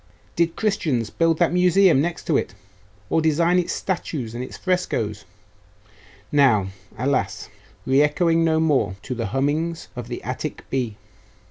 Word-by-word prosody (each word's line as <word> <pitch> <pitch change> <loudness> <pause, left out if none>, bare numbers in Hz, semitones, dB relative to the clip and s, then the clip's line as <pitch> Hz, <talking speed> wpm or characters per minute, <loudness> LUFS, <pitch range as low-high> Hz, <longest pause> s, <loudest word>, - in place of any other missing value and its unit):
Did 170 0 +1
Christians 150 - 0
build 165 -1 +2
that 170 0 +2
Museum 180 -3 +4
next 170 +2 -3
to 160 - +1
it, 95 - -1 0.6
or 165 - +3
design 165 +3 +3
its 175 - -1
statues 150 -10 -3
and 120 +1 -4
its - - -8
frescoes 115 - -1 1.1
now, 120 -10 +4 0.3
alas! 105 -7 -1 0.4
re 135 +2 +4
echoing 165 +3 +2
no 160 -1 +2
more 135 -12 +1
to 130 - -4
the 115 -3 -3
hummings 150 - -1
of 120 -2 -6
the 120 - -6
Attic 130 +4 -5
bee? 120 -6 -2
150 Hz, 145 wpm, -23 LUFS, 120-165 Hz, 1.1 s, Museum